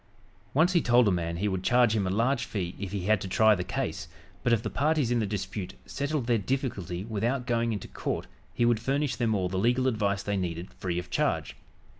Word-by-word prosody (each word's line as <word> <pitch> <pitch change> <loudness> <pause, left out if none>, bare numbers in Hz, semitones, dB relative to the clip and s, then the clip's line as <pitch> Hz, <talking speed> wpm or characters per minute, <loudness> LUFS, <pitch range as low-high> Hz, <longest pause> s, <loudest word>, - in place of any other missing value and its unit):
Once 170 +5 +4
he 170 - +4
told 120 -2 +4
a - - +4
man 85 -1 -1
he 100 +4 0
would 95 -2 -1
charge 120 +1 +4
him 100 -3 +1
a - - 0
large 115 +6 +1
fee 90 -4 -3
if 100 -2 -4
he 100 -2 -2
had 105 -1 +3
to - - -4
try 110 +3 +5
the 90 -3 -1
case, 85 - -3 0.3
but 120 - +1
if 115 -1 +3
the 110 - -2
parties 150 -3 +1
in 120 - +2
the 110 - 0
dispute 100 -2 -4
settled 140 -1 -2
their 120 -2 +2
difficulty 100 - -2
without 120 +4 -1
going 115 -2 +1
into 105 - -4
court - - -3 0.3
he 120 - +1
would 120 -2 +3
furnish 135 +1 0
them 115 -3 +1
all 95 -2 0
the 95 +1 -2
legal 125 +5 +2
advice 100 -4 0
they 105 -1 -1
needed 85 -1 -4
free 90 -2 -3
of 90 0 -5
charge. - - 0
110 Hz, 230 wpm, -28 LUFS, 95-125 Hz, 0.3 s, try